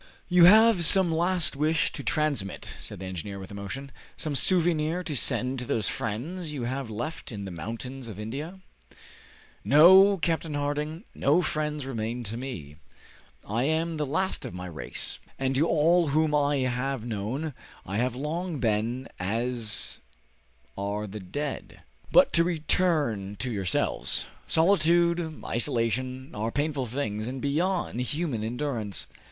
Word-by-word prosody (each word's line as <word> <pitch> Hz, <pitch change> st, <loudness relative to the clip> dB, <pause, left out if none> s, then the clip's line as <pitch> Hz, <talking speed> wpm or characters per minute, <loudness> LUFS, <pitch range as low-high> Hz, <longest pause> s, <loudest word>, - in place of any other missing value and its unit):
"You 175 Hz, -1 st, +7 dB
have 215 Hz, -1 st, +7 dB
some 185 Hz, +1 st, +8 dB
last 170 Hz, -1 st, +1 dB
wish 155 Hz, +2 st, +1 dB
to -, -, -7 dB
transmit," 145 Hz, -, -1 dB
said -, -, -8 dB
the 95 Hz, -, -6 dB
engineer 95 Hz, +2 st, -5 dB
with 95 Hz, 0 st, -9 dB
emotion, 100 Hz, +8 st, -6 dB, 0.3 s
"some 155 Hz, -, -2 dB
souvenir 165 Hz, +2 st, +2 dB
to 155 Hz, -4 st, -3 dB
send 130 Hz, +1 st, +2 dB
to 125 Hz, -, -4 dB
those 110 Hz, -3 st, 0 dB
friends 155 Hz, -, -4 dB
you 140 Hz, -5 st, -4 dB
have 130 Hz, 0 st, -3 dB
left 125 Hz, +10 st, -5 dB
in 100 Hz, -3 st, -6 dB
the 95 Hz, -, -6 dB
mountains 115 Hz, +9 st, -6 dB
of 105 Hz, -3 st, -8 dB
India?" 145 Hz, -, -6 dB, 1.0 s
"No, 190 Hz, +7 st, +7 dB
Captain 165 Hz, -2 st, -1 dB
Harding; 150 Hz, +4 st, -2 dB
no 155 Hz, +6 st, +2 dB
friends 150 Hz, -2 st, -2 dB
remain 120 Hz, -1 st, -3 dB
to 110 Hz, 0 st, -5 dB
me! 105 Hz, -, -7 dB, 0.7 s
I 115 Hz, +5 st, 0 dB
am 160 Hz, +2 st, 0 dB
the 150 Hz, -, -1 dB
last 185 Hz, +7 st, 0 dB
of -, -, -6 dB
my 90 Hz, 0 st, -6 dB
race, 80 Hz, -5 st, -4 dB, 0.2 s
and 135 Hz, 0 st, 0 dB
to 145 Hz, +5 st, +2 dB
all 170 Hz, +2 st, +3 dB
whom 155 Hz, +1 st, +2 dB
I 145 Hz, -1 st, +2 dB
have 130 Hz, -1 st, -2 dB
known 120 Hz, +8 st, -3 dB, 0.3 s
I 95 Hz, +2 st, -3 dB
have 125 Hz, +1 st, 0 dB
long 160 Hz, +5 st, -3 dB
been 115 Hz, +2 st, -1 dB
as 115 Hz, +3 st, -1 dB, 0.8 s
are 100 Hz, +2 st, -3 dB
the 105 Hz, +1 st, -7 dB
dead. 140 Hz, +10 st, -5 dB, 0.3 s
But -, -, +6 dB
to 170 Hz, -, +5 dB
return 155 Hz, -, 0 dB
to 115 Hz, +5 st, -3 dB
yourselves. 95 Hz, -4 st, 0 dB, 0.2 s
Solitude, 170 Hz, -1 st, +2 dB
isolation, 125 Hz, +3 st, -1 dB
are 110 Hz, +2 st, -2 dB
painful 145 Hz, -2 st, -1 dB
things, 110 Hz, -4 st, -3 dB
and 130 Hz, +1 st, -4 dB
beyond 155 Hz, -1 st, -1 dB
human 140 Hz, -4 st, -2 dB
endurance. 115 Hz, -3 st, -3 dB
135 Hz, 145 wpm, -27 LUFS, 110-160 Hz, 1.0 s, some